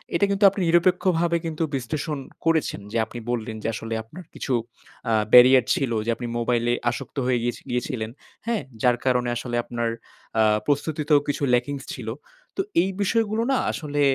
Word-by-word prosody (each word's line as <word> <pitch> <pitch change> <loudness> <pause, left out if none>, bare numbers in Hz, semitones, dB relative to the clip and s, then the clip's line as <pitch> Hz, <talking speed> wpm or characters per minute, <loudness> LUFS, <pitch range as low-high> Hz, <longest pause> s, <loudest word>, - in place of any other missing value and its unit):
এটা 200 - +4
কিন্তু 200 +1 0
আপনি 200 0 -5
নিরপেক্ষভাবে 175 0 +3
কিন্তু 165 0 -2
বিশ্লেষণ 145 +4 -3 0.3
করেছেন। 160 -10 +1
যে 115 - -1
আপনি 120 +2 -8
বললেন 110 -2 -3
যে - - -1
আসলে 115 +1 -5
আপনার 160 +12 -11
কিছু 135 - -3 0.6
আ - - +3 0.2
barrier 125 +1 +9
ছিল 135 -4 -1
যে - - -2
আপনি 120 +1 -5
মোবাইলে 120 0 +1 0.2
আসক্ত 125 - -8
হয়ে 125 -1 +2
গিয়েছ 120 0 -1
গিয়েছিলেন, 120 -2 -2 0.4
হ্যাঁ? 230 -2 0 0.2
যার 125 -1 +3
কারণে 125 -1 +2
আসলে 120 0 -4
আপনার 120 -1 -2 0.5
আ - - +6 0.2
প্রস্তুতিতেও 150 +1 +2
কিছু 145 0 -2
lackings 135 +3 0
ছিল। 120 -4 -8 0.5
তো - - +2 0.2
এই 190 - 0
বিষয়গুলো 220 +2 +1
না 265 - +3
আসলে 145 -2 -3
135 Hz, 165 wpm, -24 LUFS, 120-165 Hz, 0.6 s, barrier